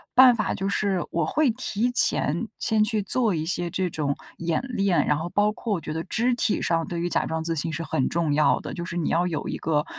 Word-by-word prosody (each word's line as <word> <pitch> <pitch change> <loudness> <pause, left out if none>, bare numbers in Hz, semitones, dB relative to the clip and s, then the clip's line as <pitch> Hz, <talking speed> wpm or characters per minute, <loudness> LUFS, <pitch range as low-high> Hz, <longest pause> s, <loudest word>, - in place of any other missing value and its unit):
办 255 -1 +8
法 215 -3 -1
就 195 +1 -2
是， 200 -3 0
我 170 -1 0
会 300 - +2
提 240 0 -1
前 225 -5 +3
先 220 -1 +1
去 215 -1 0
做 215 -1 +1
一 155 - -2
些 175 +1 -1
这 185 +1 -1
种 145 -3 -1 0.2
演 170 +3 -1
练。 200 -7 +1
然 150 - +2
后 160 +3 -4
包 205 +3 +2
括 220 0 -3
我 175 - -2
觉 - - -6
得 160 +1 -3
肢 240 +6 +1
体 230 - 0
上 165 -1 0
对 170 -1 -3
于 175 - -1
假 - - 0
装 160 0 -3
自 165 0 -2
信 160 +2 -1
是 165 +3 -3
很 135 -4 0
重 165 -3 0
要 150 +1 +3
的， - - -7
就 170 -1 -5
是 170 - -6
你 170 -3 -1
要 175 +2 +1
有 160 -4 -3
一 - - -3
个 150 -1 0
175 Hz, 270 characters per minute, -25 LUFS, 160-210 Hz, 0.2 s, 办